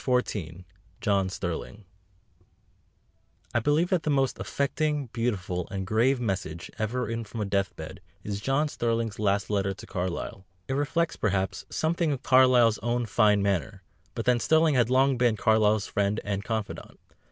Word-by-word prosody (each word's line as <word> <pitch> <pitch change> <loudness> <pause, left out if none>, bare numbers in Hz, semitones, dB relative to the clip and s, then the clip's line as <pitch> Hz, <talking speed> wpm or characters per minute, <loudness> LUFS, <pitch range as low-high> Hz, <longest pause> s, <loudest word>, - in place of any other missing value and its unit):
XIV 95 - -1 0.4
JOHN 100 -3 +1
STERLING 95 +3 -5 1.7
I 120 - +3
believe 150 +8 +1
that 180 -3 +2
the 155 - -2
most 135 -2 +1
affecting, 150 +1 -1
beautiful, 95 -7 -2
and 95 -1 -4
grave 120 +6 +2
message 95 -7 -3
ever 115 +4 -1
written 115 0 -3
from 110 +1 -6
a - - 0
death 100 -1 -1
bed - - -9 0.2
is 100 -1 -4
John 135 +6 +1
Sterling's 115 -5 -2
last 100 0 0
letter 100 -1 0
to - - -11
Carlyle. 95 0 -4 0.2
It - - -2
reflects, 145 +4 0
perhaps, 95 -2 -1
something 165 0 0
of 135 -1 -6
Carlyle's 125 -4 +5
own 120 +2 -1
fine 105 -3 +3
manner, 100 0 -1 0.3
but 115 - -3
then 125 -1 +3
Sterling 160 +3 +3
had 120 -3 +3
long 130 0 +3
been 120 -3 +3
Carlyle's 110 -1 +3
friend 100 +1 0
and 100 -1 -2
confidant. 110 -2 -5
110 Hz, 155 wpm, -27 LUFS, 100-130 Hz, 1.7 s, Carlyle's